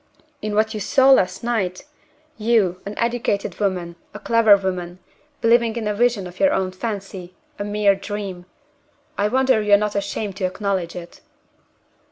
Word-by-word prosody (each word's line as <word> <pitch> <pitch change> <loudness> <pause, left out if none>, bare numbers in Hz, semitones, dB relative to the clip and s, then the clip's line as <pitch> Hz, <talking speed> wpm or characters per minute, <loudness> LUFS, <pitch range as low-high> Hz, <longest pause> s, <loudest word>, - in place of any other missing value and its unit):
"In 210 -1 -3
what 220 +1 +2
you 215 - -4
saw 265 +6 +4
last 185 -7 +3
night! 215 -4 -2 0.5
You, 210 -5 +1
an 205 - -7
educated 235 -4 -1
woman, 180 -4 -2 0.2
a - - -6
clever 225 -3 +5
woman, 180 -2 -4 0.4
believing 230 0 +3
in 225 -3 -3
a 210 - 0
vision 230 -2 +1
of 180 0 -11
your 290 0 +4
own 190 -1 -1
fancy 190 -3 -6 0.2
a - - -2
mere 205 -1 +2
dream! 195 -2 -6 0.7
I 205 - +1
wonder 260 0 +2
you 210 -1 +2
are - - +9
not 210 0 -2
ashamed 200 0 -3
to 190 - -1
acknowledge 185 -2 -2
it!" 175 -1 -10
205 Hz, 165 wpm, -21 LUFS, 185-225 Hz, 0.7 s, are